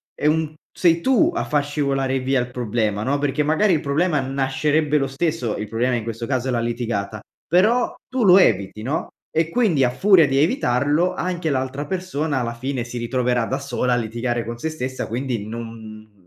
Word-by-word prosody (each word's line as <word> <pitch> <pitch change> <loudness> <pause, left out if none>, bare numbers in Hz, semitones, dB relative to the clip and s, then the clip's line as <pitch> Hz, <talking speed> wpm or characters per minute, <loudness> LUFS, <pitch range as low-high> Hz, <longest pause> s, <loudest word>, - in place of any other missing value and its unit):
è - - -5
un 155 0 +1 0.2
sei 170 -2 +2
tu 265 - +3
a - - 0
far 145 -1 0
scivolare 135 -2 0
via 130 +1 +1
il 125 0 -2
problema, 110 -4 -1
no, 140 +4 +1
perché 145 +1 0
magari 160 +7 +3
il 155 - +1
problema 155 +2 +1
nascerebbe 140 +3 0
lo 135 -2 0
stesso, 135 -4 -2
il 105 - -4
problema 120 +4 0
in 115 - -2
questo 115 +1 -5
caso 130 -2 -1
è - - 0
la 120 - 0
litigata, 115 -3 -3 0.3
però 215 +9 +3
tu 260 -1 -1
lo 185 -2 +7
eviti, 105 - +2
no, 145 +7 -2 0.2
e 160 0 +1
quindi 180 - +2
a 125 - +3
furia 180 +6 +5
di 135 0 0
evitarlo, 150 - +2
anche 175 -3 -2
l'altra 135 +1 -2
persona, 160 -6 -2
alla 115 -1 -3
fine, 130 +1 -3
si 120 0 -7
ritroverà 125 0 0
da 130 - -2
sola 125 -2 -1
a - - +3
litigare 120 +1 -2
con 120 +1 -6
se 160 - -2
stessa, 130 -4 -4
quindi 120 -2 -3
non 110 -1 -9
135 Hz, 195 wpm, -22 LUFS, 120-155 Hz, 0.3 s, lo